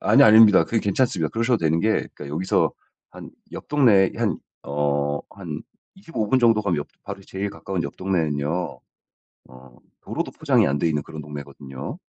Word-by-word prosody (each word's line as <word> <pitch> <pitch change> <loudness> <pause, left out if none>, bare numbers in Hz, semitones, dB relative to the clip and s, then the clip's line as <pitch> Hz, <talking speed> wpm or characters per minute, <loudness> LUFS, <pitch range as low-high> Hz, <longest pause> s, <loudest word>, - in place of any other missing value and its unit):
아니요, - - +6
아닙니다. 110 -2 +7
그게 115 -2 0
괜찮습니다. 100 - 0
그러셔도 115 +1 +1
되는 80 -1 +1
게 110 0 +1
여기서 75 +6 0 0.4
한 - - -11 0.2
옆 - - -8
동네 115 -10 +4
한 - - 0 0.3
어 70 0 -1
한 - - -7 0.3
25 165 - -4
분 130 - +3
정도 115 -3 +4
가면 75 -7 -1 0.2
바로 100 0 -7
제일 95 +1 -4
가까운 95 -2 -4
옆 70 - -6
동네는요. 85 -2 -2 0.7
어 65 -1 -16 0.2
도로도 - - -4
포장이 - - +2
안 70 - 0
돼 85 - +2
있는 75 -1 -1
그런 80 -1 -9
동네거든요. 70 - -8
90 Hz, 325 characters per minute, -23 LUFS, 75-110 Hz, 0.7 s, 아닙니다